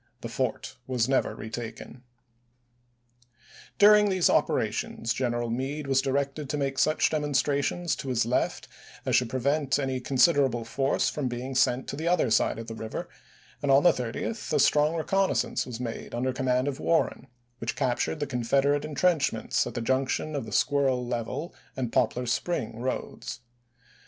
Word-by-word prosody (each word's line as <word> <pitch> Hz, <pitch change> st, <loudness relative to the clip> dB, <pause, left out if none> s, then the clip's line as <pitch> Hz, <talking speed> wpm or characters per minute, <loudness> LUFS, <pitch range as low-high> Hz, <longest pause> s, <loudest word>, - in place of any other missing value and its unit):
The -, -, -5 dB
fort -, -, -3 dB
was 125 Hz, -3 st, +1 dB
never 135 Hz, 0 st, +1 dB
retaken. 115 Hz, +2 st, -7 dB, 1.8 s
During 210 Hz, 0 st, +7 dB
these 185 Hz, -3 st, +3 dB
operations 115 Hz, -, 0 dB
General 120 Hz, -2 st, -1 dB
Meade 135 Hz, +5 st, -3 dB
was 135 Hz, -1 st, +2 dB
directed 140 Hz, +1 st, -2 dB
to 150 Hz, -, -1 dB
make 135 Hz, -2 st, -1 dB
such 155 Hz, -, +3 dB
demonstrations 150 Hz, +2 st, 0 dB
to 140 Hz, -, -5 dB
his 120 Hz, -3 st, +1 dB
left 120 Hz, +2 st, -1 dB, 0.4 s
as -, -, +2 dB
should 125 Hz, -2 st, +2 dB
prevent 140 Hz, +3 st, +1 dB
any 135 Hz, -2 st, -1 dB
considerable 130 Hz, -3 st, +3 dB
force 135 Hz, +4 st, 0 dB
from 145 Hz, -4 st, -2 dB
being 125 Hz, +2 st, -4 dB
sent 125 Hz, 0 st, +2 dB
to -, -, -3 dB
the 160 Hz, +4 st, -3 dB
other 170 Hz, -9 st, +2 dB
side 110 Hz, -, +2 dB
of 115 Hz, -, -6 dB
the 115 Hz, -, -7 dB
river, 110 Hz, 0 st, -6 dB, 0.5 s
and 145 Hz, -, -1 dB
on 135 Hz, +1 st, +6 dB
the 175 Hz, -, +7 dB
30th 125 Hz, -, -4 dB
a -, -, +2 dB
strong 150 Hz, +2 st, +4 dB
reconnaissance 195 Hz, +1 st, 0 dB
was 120 Hz, -2 st, -6 dB
made 120 Hz, -2 st, -5 dB
under 130 Hz, +2 st, -1 dB
command 130 Hz, 0 st, 0 dB
of 140 Hz, -2 st, -3 dB
Warren, 160 Hz, -5 st, 0 dB, 0.3 s
which 115 Hz, -, -3 dB
captured 125 Hz, +5 st, -1 dB
the 145 Hz, -, -1 dB
Con 125 Hz, -4 st, -3 dB
federate 140 Hz, +4 st, +2 dB
intrenchments 145 Hz, -6 st, +1 dB
at 120 Hz, -, -7 dB
the 120 Hz, -, -2 dB
junction 130 Hz, +5 st, 0 dB
of 140 Hz, -, -3 dB
the -, -, -8 dB
Squirrel 135 Hz, -3 st, +2 dB
Level 120 Hz, +7 st, -4 dB, 0.2 s
and 125 Hz, -3 st, -3 dB
Poplar 125 Hz, +2 st, +1 dB
Spring 120 Hz, -3 st, -2 dB
roads. 125 Hz, -1 st, -4 dB
135 Hz, 160 wpm, -27 LUFS, 120-145 Hz, 1.8 s, During